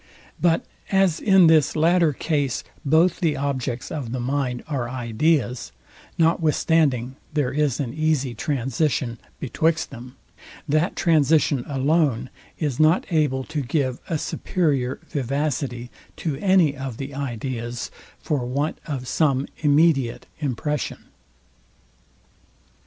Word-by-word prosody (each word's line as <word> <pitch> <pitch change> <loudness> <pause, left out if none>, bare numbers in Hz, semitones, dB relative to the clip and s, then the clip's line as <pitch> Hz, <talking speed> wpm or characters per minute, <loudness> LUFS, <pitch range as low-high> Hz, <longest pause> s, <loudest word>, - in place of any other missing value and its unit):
But 165 -2 +2 0.3
as 190 -4 +3
in 190 -3 +5
this 160 -2 +4
latter 165 +1 +4
case, 145 -2 -1 0.2
both 160 +5 +3
the 160 -4 +1
objects 130 -3 -3
of 135 -7 -4
the 130 - -2
mind 125 -1 -1
are 130 -6 -2
ideas; 125 +2 0 0.5
notwithstanding 155 -5 +2 0.2
there 145 -4 +1
is 145 -3 +1
an 125 -5 -2
easy 155 -5 0
transition 130 -1 -1 0.2
betwixt 160 +4 0
them; 125 +2 -10 0.5
that 155 +5 +1
transition 155 -5 +3
alone 135 -3 +1 0.3
is 145 -6 -2
not 155 +3 +4
able 145 -5 +1
to 155 +1 -3
give 130 -1 -1
a 165 - 0
superior 140 -6 -1
vivacity 135 -3 -2 0.2
to 155 -5 -3
any 185 -4 +3
of 130 -4 -6
the 140 +1 -6
ideas, 120 -3 -4 0.3
for 145 -5 -2
want 140 +5 -2
of 135 -5 -4
some 140 -3 +2
immediate 145 -4 +3
impression. 150 0 -2
140 Hz, 115 wpm, -23 LUFS, 130-155 Hz, 0.5 s, in